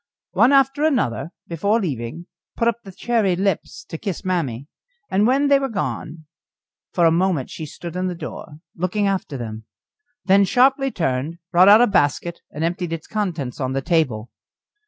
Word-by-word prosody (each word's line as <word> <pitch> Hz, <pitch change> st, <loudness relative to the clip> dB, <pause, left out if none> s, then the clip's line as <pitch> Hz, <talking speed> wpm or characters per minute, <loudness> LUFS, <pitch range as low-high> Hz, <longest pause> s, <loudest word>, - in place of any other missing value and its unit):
One 260 Hz, -, +4 dB
after 275 Hz, +1 st, +3 dB
another, 245 Hz, -, +1 dB, 0.2 s
before 200 Hz, +7 st, +1 dB
leaving, 145 Hz, -, -4 dB, 0.3 s
put 230 Hz, -, +1 dB
up 235 Hz, -1 st, +1 dB
the 195 Hz, -, -10 dB
cherry 210 Hz, -1 st, 0 dB
lips 185 Hz, -4 st, -2 dB
to 160 Hz, -, -7 dB
kiss 195 Hz, -2 st, -5 dB
mammy; 140 Hz, -9 st, -1 dB, 0.5 s
and 205 Hz, +3 st, +3 dB
when 275 Hz, +3 st, +3 dB
they 280 Hz, -1 st, +5 dB
were 270 Hz, -1 st, -2 dB
gone, 160 Hz, -7 st, -4 dB, 0.7 s
for 175 Hz, -, +2 dB
a 165 Hz, -, +5 dB
moment 170 Hz, -5 st, 0 dB
she 155 Hz, -, -6 dB
stood 170 Hz, +3 st, -8 dB
in 185 Hz, 0 st, -1 dB
the 180 Hz, -, -3 dB
door 155 Hz, -2 st, -8 dB
looking 185 Hz, +4 st, -1 dB
after 190 Hz, -8 st, -1 dB
them, 110 Hz, -2 st, -7 dB, 0.6 s
then 200 Hz, +1 st, +5 dB
sharply 265 Hz, +6 st, +3 dB
turned, 160 Hz, -, -2 dB
brought 185 Hz, +2 st, +6 dB
out 215 Hz, +3 st, +8 dB
a -, -, +7 dB
basket, 170 Hz, -3 st, 0 dB
and 150 Hz, -, -5 dB
emptied 175 Hz, 0 st, -2 dB
its 165 Hz, -1 st, -5 dB
contents 170 Hz, -, -3 dB
on 130 Hz, -1 st, -2 dB
the 135 Hz, -, -1 dB
table. 130 Hz, -10 st, 0 dB
180 Hz, 175 wpm, -21 LUFS, 155-210 Hz, 0.7 s, out